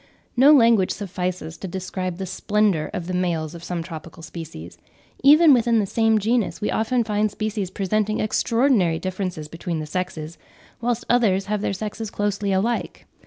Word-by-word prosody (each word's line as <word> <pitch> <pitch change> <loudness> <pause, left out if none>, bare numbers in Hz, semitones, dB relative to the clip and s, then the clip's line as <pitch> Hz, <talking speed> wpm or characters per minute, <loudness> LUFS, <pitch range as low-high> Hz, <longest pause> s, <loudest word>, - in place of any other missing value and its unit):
No 265 +4 +7
language 230 -9 +5
suffices 180 -4 -4
to 190 - -5
describe 185 -1 -4
the 190 - -4
splendour 195 -3 0
of 175 - -4
the 185 - -4
males 170 -3 -1
of 170 -1 -10
some 175 -1 -3
tropical 165 -1 -9
species. 155 - -9 0.4
Even 300 +2 +8
within 235 -2 +3
the 210 - +2
same 225 +2 +2
genus 220 +1 0
we 210 - -1
often 235 +2 +1
find 210 -1 0
species 215 -2 -3
presenting 210 +3 -1
extraordinary 215 -5 +2
differences 185 -4 -4
between 165 +1 -4
the 155 - -4
sexes, 160 -1 -5 0.4
whilst 240 0 -1
others 200 -6 +2
have 210 0 -2
their - - -1
sexes 210 +2 -5
closely 205 -1 -1
alike. 215 +5 -1
195 Hz, 165 wpm, -23 LUFS, 175-220 Hz, 0.4 s, Even